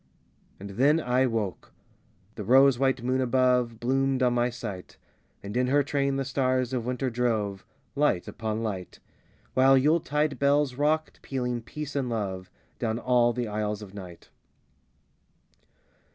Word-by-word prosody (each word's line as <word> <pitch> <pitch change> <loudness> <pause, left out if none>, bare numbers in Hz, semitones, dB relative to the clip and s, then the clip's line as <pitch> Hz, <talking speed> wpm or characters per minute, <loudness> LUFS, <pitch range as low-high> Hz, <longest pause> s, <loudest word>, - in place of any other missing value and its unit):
And 100 +1 -8
then 140 +10 +3
I 130 -2 +2
woke. 110 -6 -3 0.6
The 105 - -6
rose 130 +3 +5
white 135 -3 +1
moon 130 +1 +1
above 125 -2 +2
Bloomed 135 +1 +1
on 125 -1 +3
my 120 0 +1
sight; 110 -6 -8 0.5
And 100 +2 -7
in 125 0 +2
her 145 +2 +3
train 140 -1 0
the 135 0 -1
stars 130 -1 0
of 120 -2 -2
winter 125 +1 -1
drove, 110 -5 -1 0.3
Light 145 -11 +1
upon 110 0 -3
light; 95 -5 -5 0.6
While 135 +1 +5
Yuletide 150 -1 +1
bells 140 -1 +2
rocked, 150 +4 -1
pealing 125 -3 -3
"peace 150 +5 -7
and 135 -3 -1
love" 95 -5 -3 0.3
Down 110 -2 -1
all 120 -1 +3
the 120 -1 -3
aisles 105 0 -3
of 100 -2 -12
night. 90 -4 -11
125 Hz, 145 wpm, -27 LUFS, 110-135 Hz, 0.6 s, rose